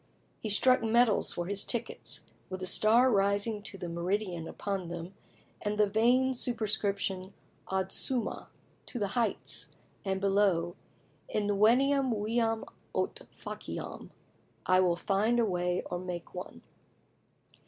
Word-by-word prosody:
He 220 - -4
struck 255 +5 +4
medals 225 0 +3
for 175 - -3
his 200 +2 0
tickets, 235 -1 -2 0.3
with 185 0 -5
a - - -1
star 230 +7 +5
rising 205 +1 +1
to 205 -1 -5
the 175 - -5
meridian 175 0 -2
upon 195 -3 -3
them, 175 +2 -6 0.5
and 210 0 -2
the 210 - +5
vain 245 +6 +3
superscription 200 -5 0 0.4
"Ad 190 0 0
summa" 250 -4 -1 0.4
("To - - -5
the 205 -4 -1
heights"), 235 +1 -1 0.4
and 190 -1 -1
below, 195 -4 +2 0.5
"Inveniam 235 +7 +3
viam 225 +1 0 0.3
aut - - -1
faciam" - - -7 0.6
("I 185 0 +4
will 180 -2 +3
find 210 +6 +1
a 235 - +4
way 180 -2 0
or 175 - -4
make 180 -2 -6
one"). - - -8
205 Hz, 130 wpm, -31 LUFS, 185-225 Hz, 0.6 s, star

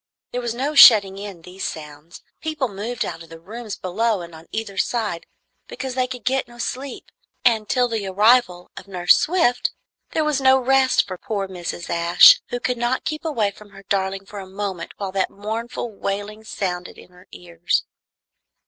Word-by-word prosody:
There 250 - -3
was 235 -1 -3
no 275 +5 -2
shutting 205 -8 +8
in 200 -5 -8
these 180 +2 -9
sounds. 150 +1 -8 0.2
People 310 -4 -2
moved 220 +4 -4
out 165 - -6
of 165 - -13
the 165 0 -11
rooms 215 +5 -7
below 210 +2 -1
and 170 -1 -10
on 160 +1 -13
either 220 -3 -4
side, 205 -5 -2 0.4
because 260 0 -5
they 255 0 0
could 250 -1 -8
get 265 +1 0
no 240 0 -15
sleep; 260 +3 -5 0.3
and 220 -3 +3
till 250 -1 +2
the 220 -4 -3
arrival 200 -2 +3
of 190 - -10
Nurse 180 -2 +4
Swift, 325 -8 +1 0.4
there 315 - +1
was 300 -3 0
no 265 0 +6
rest 265 0 +3
for 185 -2 -7
poor 200 -3 -3
Mrs. 175 -2 -6
Ashe, 170 0 +7
who 245 - -3
could 250 0 -2
not 240 +2 -1
keep 305 +1 -3
away 230 -11 0
from 205 +1 -16
her 195 0 -14
darling 195 0 -2
for 205 +1 -9
a 190 - -8
moment 190 -3 -5
while 195 -2 -4
that 190 -1 0
mournful 225 +3 -5
wailing 205 +1 -5
sounded 180 -4 -4
in - - -15
her 180 +2 -19
ears. 175 -1 -2
205 Hz, 185 wpm, -22 LUFS, 185-245 Hz, 0.4 s, shutting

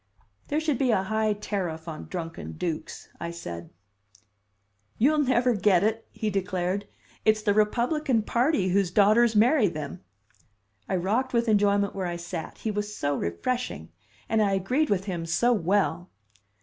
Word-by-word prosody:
"There 295 - 0
should 310 -5 -1
be 265 -2 +2
a 195 -5 +2
high 220 +1 +1
tariff 185 -6 -4
on 155 -2 -7
drunken 165 - -6
dukes," 160 - -5
I 170 - -4
said. 85 - -7 1.3
"You'll 300 +6 +3
never 250 -3 +3
get 200 -3 +3
it!" 225 +1 -1
he 215 -1 -3
declared. 185 0 -1 0.4
"It's 215 0 +3
the 205 - +3
Republican 240 +4 +1
party 235 - +1
whose 195 0 +2
daughters 215 +4 +4
marry 235 +2 +5
them." 155 -4 -6 0.9
I 190 - +1
rocked 220 +9 0
with 235 0 +2
enjoyment 205 -1 +3
where 190 -2 -3
I 175 - -3
sat; 170 -1 -6
he 220 - -3
was 210 0 -3
so 145 0 -1
refreshing. 85 - -3 0.4
And 220 -1 +2
I 200 -2 +2
agreed 250 +11 +1
with 195 -1 0
him 175 -4 -4
so 235 +9 +3
well. 185 -3 0
205 Hz, 155 wpm, -26 LUFS, 175-235 Hz, 1.3 s, marry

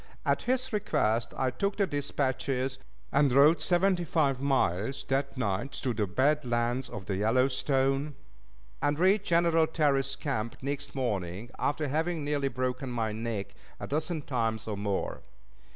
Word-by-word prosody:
At - - +2
his 255 0 -1
request 115 - +1
I 130 -1 +1
took 200 +11 -2
the 200 - +3
dispatches, 135 -3 -1 0.3
and 140 -1 +3
rode 145 +5 +6
seventy 180 0 +2
five 140 -5 +1
miles 130 -3 0
that 135 0 0
night 120 +4 -2
through 125 - -1
the 105 -2 -1
bad 145 +10 +2
lands 120 +1 0
of 100 -3 -7
the 95 0 -2
Yellowstone, 135 +5 +1 0.7
and 145 +1 +1
reached 190 +4 +3
General 170 -1 +4
Terry's 140 -3 +1
camp 125 -6 -3
next 140 +1 -3
morning, 105 -3 -2
after 145 +1 0
having 160 +2 -1
nearly 145 -1 0
broken 130 0 -2
my 115 -3 -1
neck 105 -3 -4 0.3
a - - -4
dozen 155 +1 -2
times 115 -5 -1
or 105 - -2
more. 100 -1 -2
135 Hz, 150 wpm, -29 LUFS, 120-150 Hz, 0.7 s, rode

